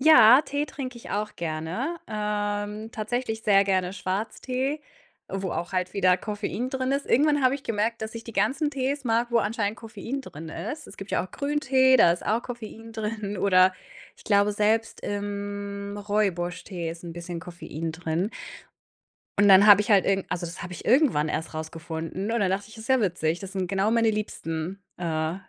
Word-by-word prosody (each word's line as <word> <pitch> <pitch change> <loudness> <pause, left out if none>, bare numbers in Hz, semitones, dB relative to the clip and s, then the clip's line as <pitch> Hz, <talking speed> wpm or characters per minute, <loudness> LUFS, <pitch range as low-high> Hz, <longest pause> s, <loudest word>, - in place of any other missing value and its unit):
Ja, 265 -4 +8
Tee 290 -1 -2
trinke 260 -3 -6
ich 235 - -10
auch 210 +1 -2
gerne, 170 - -3
ähm, 210 0 -2
tatsächlich 220 +1 -3
sehr 200 -2 +5
gerne 190 -2 0
Schwarztee, 250 +9 -2 0.5
wo 190 -1 -3
auch 175 - -4
halt 185 -1 -1
wieder 185 -2 +4
Koffein 210 +5 -3
drin 260 -1 -1
ist. 275 +1 0
Irgendwann 290 +2 +3
habe 255 +1 +4
ich 280 - -6
gemerkt, 225 0 -1
dass 220 +1 -5
ich 230 0 -7
die 230 - -8
ganzen 265 +10 +1
Tees 275 0 -2
mag, 235 0 +1
wo 235 - +4
anscheinend 210 0 -1
Koffein 235 +4 -5
drin 160 - -9
ist. 215 - -6
Es - - -12
gibt 195 +1 -8
ja - - +1
auch 185 - -12
Grüntee, 270 -2 +3
da 215 - +6
ist 175 - -2
auch 225 +3 +1
Koffein 225 -2 -8
drin, 210 -2 -3
oder 185 -1 +5 0.4
ich - - -18
glaube, 205 0 +3
selbst 215 +2 +1
im 200 0 -4
Rooibos-Tee 185 -4 -1
ist 170 +1 -9
'n 170 - -6
bisschen 170 0 -6
Koffein 165 -2 -6
drin. 165 +4 -2 1.1
Und 205 0 +6
dann 195 +1 +8
habe 205 -1 +9
ich 210 - -2
halt 200 -2 +6
irgen 195 -1 +1
also, 175 -1 -2
das 170 - -8
habe 180 - -6
ich 175 - -8
irgendwann 240 - +4
erst 160 +1 -3
rausgefunden 165 +4 -4
und 235 0 +1
dann 195 -2 +2
dachte 195 +2 -1
ich: 220 - -13
„Ist 220 +1 -10
ja 260 -1 +4
witzig, 175 -5 0
das 195 -1 -7
sind 190 -2 -1
genau 195 +3 +1
meine 230 -1 +3
liebsten, 190 -3 -4 0.2
äh, 160 -2 -1
205 Hz, 190 wpm, -26 LUFS, 185-230 Hz, 1.1 s, habe